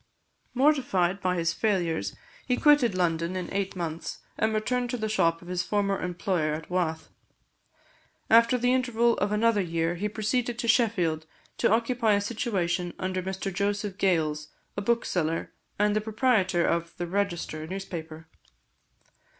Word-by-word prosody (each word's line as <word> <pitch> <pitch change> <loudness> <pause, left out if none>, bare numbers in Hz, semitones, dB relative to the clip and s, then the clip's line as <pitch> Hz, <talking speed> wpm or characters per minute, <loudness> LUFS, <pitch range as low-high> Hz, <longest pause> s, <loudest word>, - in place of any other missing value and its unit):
Mortified 245 - +2
by 180 -1 +1
his 170 -1 0
failures, 170 - 0 0.3
he 250 -1 +1
quitted 290 -9 +4
London 170 0 0
in 185 0 -4
eight 195 -1 -2
months, 165 -2 -4 0.2
and 220 - +1
returned 245 +3 -1
to 250 - -2
the 220 -1 -2
shop 165 -6 +1
of - - -13
his 180 0 -1
former 200 0 0
employer 175 -3 -1
at 160 +3 -9
Wath. 160 -3 -1 1.2
After 230 +2 +5
the 245 +1 +2
interval 235 -2 +2
of 205 - 0
another 210 0 +3
year, 165 -1 -1
he 200 +5 -2
proceeded 230 +3 -1
to 235 - -3
Sheffield, 185 -10 +2 0.3
to - - +3
occupy 230 0 +2
a 200 - +2
situation 190 -6 -1
under 185 0 -2
Mr 190 +1 -4
Joseph 200 +1 -2
Gales, 155 -5 +1 0.3
a 200 - -2
bookseller, 180 -7 -1 0.2
and 210 0 +2
the 215 - +2
proprietor 215 -5 +2
of 170 0 -1
the 175 - -2
Register 175 -4 -2
newspaper. 165 -4 -7
195 Hz, 150 wpm, -27 LUFS, 170-225 Hz, 1.2 s, After